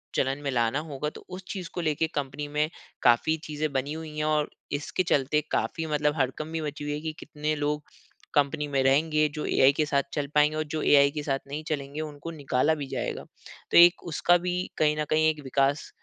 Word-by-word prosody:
चलन 135 Hz, +1 st, 0 dB
में 140 Hz, -, -1 dB
लाना 120 Hz, +2 st, +1 dB
होगा, 150 Hz, -1 st, -4 dB
तो -, -, -13 dB
उस 185 Hz, +1 st, -7 dB
चीज़ 185 Hz, -4 st, -5 dB
को 175 Hz, -, -3 dB
लेके 160 Hz, 0 st, +1 dB
कंपनी 145 Hz, +1 st, -3 dB
में 150 Hz, +1 st, 0 dB, 0.3 s
काफ़ी 125 Hz, +7 st, +4 dB
चीज़ें 155 Hz, 0 st, -2 dB
बनी 135 Hz, +2 st, -1 dB
हुई 155 Hz, -1 st, -7 dB
हैं 150 Hz, -, 0 dB
और 150 Hz, -1 st, +1 dB, 0.2 s
इसके 150 Hz, +5 st, -1 dB
चलते 145 Hz, -2 st, +2 dB
काफ़ी 165 Hz, -, -1 dB
मतलब 150 Hz, -1 st, +1 dB
हड़कंप 135 Hz, +2 st, -1 dB
भी 165 Hz, -, -1 dB
मची 150 Hz, -1 st, -5 dB
हुई 145 Hz, 0 st, -2 dB
है 150 Hz, -, -3 dB
कि 160 Hz, 0 st, -4 dB
कितने 150 Hz, +1 st, -3 dB
लोग 150 Hz, 0 st, -1 dB, 0.5 s
कंपनी 145 Hz, +1 st, +1 dB
में 135 Hz, -1 st, +1 dB
रहेंगे, 155 Hz, +3 st, +3 dB
जो 150 Hz, +1 st, -5 dB
एआई 135 Hz, +1 st, +5 dB
के 155 Hz, +1 st, +1 dB
साथ 140 Hz, -2 st, +1 dB
चल 145 Hz, -2 st, -1 dB
पाएँगे 150 Hz, +1 st, +4 dB
और 155 Hz, -, 0 dB
जो 155 Hz, -, -1 dB
एआई 140 Hz, -1 st, +6 dB
के 150 Hz, 0 st, -4 dB
साथ 135 Hz, -2 st, 0 dB
नहीं 145 Hz, +3 st, -5 dB
चलेंगे, 145 Hz, 0 st, -3 dB
उनको 150 Hz, +1 st, -6 dB
निकाला 145 Hz, 0 st, +1 dB
भी 145 Hz, -3 st, -5 dB
जाएगा। -, -, -3 dB, 0.5 s
तो -, -, +5 dB
एक 175 Hz, 0 st, +7 dB
उसका 170 Hz, +2 st, +3 dB
भी 180 Hz, 0 st, -2 dB, 0.2 s
कहीं 150 Hz, 0 st, +2 dB
न 150 Hz, -, 0 dB
कहीं 155 Hz, 0 st, +4 dB
एक 155 Hz, -1 st, -2 dB
विकास 140 Hz, +2 st, +1 dB
150 Hz, 215 wpm, -27 LUFS, 140-155 Hz, 0.5 s, एक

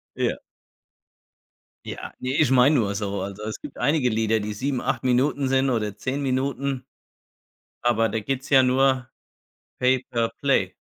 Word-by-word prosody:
Ja. -, -, -1 dB, 1.5 s
Ja, -, -, -7 dB
ne, 130 Hz, +1 st, -2 dB
ich 145 Hz, -4 st, +3 dB
meine 135 Hz, +4 st, +5 dB
nur 105 Hz, -5 st, +1 dB
so, 100 Hz, -2 st, -3 dB
also 100 Hz, +2 st, -6 dB
es 110 Hz, 0 st, -5 dB
gibt -, -, -9 dB
einige 135 Hz, -1 st, +2 dB
Lieder, 110 Hz, 0 st, +1 dB
die 105 Hz, 0 st, -4 dB
7, 130 Hz, +3 st, -2 dB
8 -, -, -2 dB
Minuten 135 Hz, +2 st, +2 dB
sind 135 Hz, 0 st, +2 dB
oder 105 Hz, -4 st, -1 dB
10 130 Hz, +6 st, -3 dB
Minuten, 135 Hz, 0 st, -1 dB, 1.0 s
aber 115 Hz, -2 st, +2 dB
da 110 Hz, -, -1 dB
geht's 135 Hz, +4 st, -4 dB
ja 135 Hz, -2 st, +7 dB
nur 130 Hz, -1 st, +2 dB, 0.7 s
Pay-per-Play. 125 Hz, -2 st, +1 dB
125 Hz, 145 wpm, -24 LUFS, 110-135 Hz, 1.5 s, ja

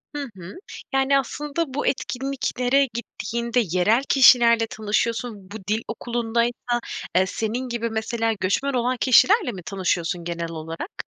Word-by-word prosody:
Hı 290 Hz, -, -2 dB, 0.2 s
hı. 180 Hz, +1 st, -9 dB, 0.4 s
Yani, 270 Hz, +1 st, +3 dB
aslında 290 Hz, +2 st, -3 dB
bu 295 Hz, -, -1 dB
etkinliklere 270 Hz, 0 st, 0 dB
gittiğinde 235 Hz, +1 st, -2 dB, 0.2 s
yerel 220 Hz, +8 st, +3 dB
kişilerle 235 Hz, -4 st, +6 dB
tanışıyorsun. 215 Hz, -1 st, -2 dB
Bu 215 Hz, -, -5 dB
dil 215 Hz, +2 st, 0 dB
okulundaysa, 240 Hz, +1 st, -1 dB, 0.4 s
eee, 185 Hz, +1 st, +5 dB
senin 225 Hz, +6 st, -3 dB
gibi 235 Hz, -1 st, -2 dB
mesela 225 Hz, 0 st, -1 dB
göçmen 260 Hz, +9 st, 0 dB
olan 250 Hz, +1 st, 0 dB
kişilerle 360 Hz, -, +4 dB
mi 190 Hz, -5 st, -9 dB
tanışıyorsun 175 Hz, -2 st, -1 dB
genel 170 Hz, -1 st, -4 dB
olarak? 165 Hz, -, -7 dB
235 Hz, 130 wpm, -23 LUFS, 205-255 Hz, 0.4 s, kişilerle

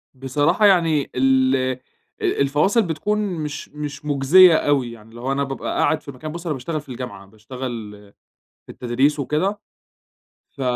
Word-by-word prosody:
بصراحة 145 Hz, +10 st, +1 dB
يعني 165 Hz, -7 st, +3 dB
ال 130 Hz, 0 st, +3 dB
أ 130 Hz, -1 st, -1 dB, 0.4 s
الفواصل 150 Hz, -, +2 dB
بتكون 190 Hz, +4 st, -1 dB
مش 160 Hz, -8 st, -4 dB
مش 150 Hz, -1 st, -7 dB
مُجزية 155 Hz, +5 st, +6 dB
أوي، 140 Hz, -6 st, +1 dB
يعني 115 Hz, -1 st, -14 dB
لو 125 Hz, +3 st, -3 dB
أنا 140 Hz, +1 st, 0 dB
بابقى 135 Hz, -1 st, -4 dB
قاعد 155 Hz, +1 st, +2 dB
في 140 Hz, -, -9 dB
مكان 150 Hz, +4 st, -8 dB
بُص 170 Hz, +2 st, -8 dB
أنا 160 Hz, -, -1 dB
باشتغل 150 Hz, +4 st, -4 dB
في 145 Hz, -, -20 dB
الجامعة، 125 Hz, -5 st, -7 dB
باشتغل 110 Hz, +1 st, -7 dB, 0.8 s
في -, -, -10 dB
التدريس 130 Hz, +5 st, 0 dB
وكده. 165 Hz, +10 st, -1 dB, 0.9 s
ف 135 Hz, -, -9 dB
140 Hz, 150 wpm, -21 LUFS, 130-155 Hz, 0.9 s, مُجزية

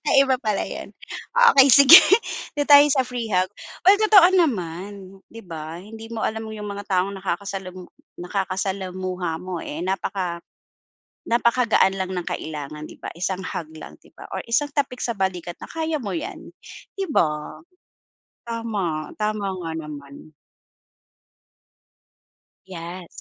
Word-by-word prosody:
Ay 275 Hz, -, +6 dB
iba 260 Hz, -1 st, +1 dB
pala 215 Hz, -4 st, -1 dB
'yon, -, -, -7 dB, 0.6 s
okey 270 Hz, 0 st, +7 dB
sige. 280 Hz, +4 st, +10 dB, 0.6 s
Do'n 290 Hz, -1 st, 0 dB
tayo 285 Hz, 0 st, +9 dB
sa 265 Hz, -2 st, +2 dB
free 245 Hz, -2 st, -5 dB
hug. 185 Hz, -2 st, +1 dB, 0.3 s
Uy 385 Hz, +2 st, +8 dB
totoo 425 Hz, -5 st, +7 dB
naman 195 Hz, -, -2 dB
'di 230 Hz, 0 st, -12 dB
ba, 160 Hz, -2 st, -7 dB
hindi 225 Hz, +2 st, -11 dB
mo 230 Hz, -1 st, -4 dB
alam 220 Hz, 0 st, -3 dB
'yong 215 Hz, -1 st, -7 dB
mga 200 Hz, 0 st, -6 dB
taong 190 Hz, +1 st, +1 dB
nakakasalamu 185 Hz, -1 st, -5 dB, 0.3 s
nakakasalamuha 185 Hz, -2 st, -3 dB
mo, 180 Hz, -1 st, -6 dB
eh, 160 Hz, +4 st, -6 dB
napaka 185 Hz, -2 st, -3 dB, 0.9 s
napakagaan 235 Hz, -4 st, +3 dB
lang 190 Hz, -1 st, -3 dB
ng 180 Hz, -1 st, -4 dB
kailangan 150 Hz, 0 st, -6 dB
'di -, -, -13 dB
ba. -, -, -5 dB
Isang 185 Hz, +1 st, -2 dB
hug 170 Hz, -3 st, -5 dB
lang 155 Hz, -, -11 dB
'di -, -, -23 dB
ba -, -, -11 dB
or -, -, -3 dB
isang 290 Hz, +5 st, +1 dB
tapik 275 Hz, -4 st, -2 dB
sa 235 Hz, -, -1 dB
balikat 180 Hz, -3 st, -3 dB
na -, -, -8 dB
kaya 320 Hz, -1 st, -2 dB
mo 200 Hz, -6 st, -4 dB
'yan, -, -, -7 dB, 0.5 s
'di 390 Hz, -1 st, -2 dB
ba? 150 Hz, -2 st, -1 dB, 0.9 s
Tama, 205 Hz, -9 st, -3 dB
tama 210 Hz, -1 st, -1 dB, 0.2 s
nga 165 Hz, -, -3 dB
naman. 150 Hz, -1 st, -9 dB, 2.4 s
Yes. 175 Hz, 0 st, -8 dB
195 Hz, 140 wpm, -23 LUFS, 175-230 Hz, 2.4 s, sige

